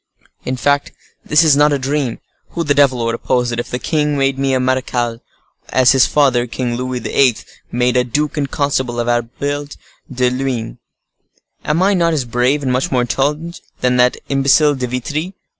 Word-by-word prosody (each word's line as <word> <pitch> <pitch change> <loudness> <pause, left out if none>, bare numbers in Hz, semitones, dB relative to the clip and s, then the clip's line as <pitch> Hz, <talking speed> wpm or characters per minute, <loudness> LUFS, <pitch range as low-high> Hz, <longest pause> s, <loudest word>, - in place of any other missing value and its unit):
In 130 0 -2
fact, 145 +2 0 0.3
this 150 +2 +4
is 155 -3 +5
not 150 +1 +4
a 145 - +2
dream, 135 -2 -2 0.4
who 170 - -2
the 145 -2 +1
devil 130 -4 +2
would 115 - 0
oppose 125 +1 0
it, 120 - -3
if 120 - -5
the 125 - -2
king 150 +2 -1
made 135 -1 0
me 135 0 +1
a - - +1
marechal, 125 -2 -1 0.5
as 130 -1 +4
his 135 -2 +4
father, 130 -5 +2
King 120 +1 -3
Louis 125 +1 -3
XIII., 130 -5 +1 0.3
made 125 0 +1
a 125 - +3
duke 145 +5 -2
and 140 -3 -2
constable 130 -4 -1
of 120 - -1
Albert 140 +5 -2 0.3
de 125 -1 +1
Luynes? 125 - -3 0.9
Am 160 +5 +1
I 200 +2 +3
not 170 -3 +2
as 140 -5 -1
brave, 125 +5 0
and 130 - 0
much 130 +1 -1
more 125 -2 +2
intelligent, 150 +7 -2 0.2
than 125 0 +2
that 125 0 +3
imbecile 140 +2 +3
De 130 -2 -3
Vitry? 145 +9 -4
130 Hz, 190 wpm, -17 LUFS, 125-145 Hz, 0.9 s, is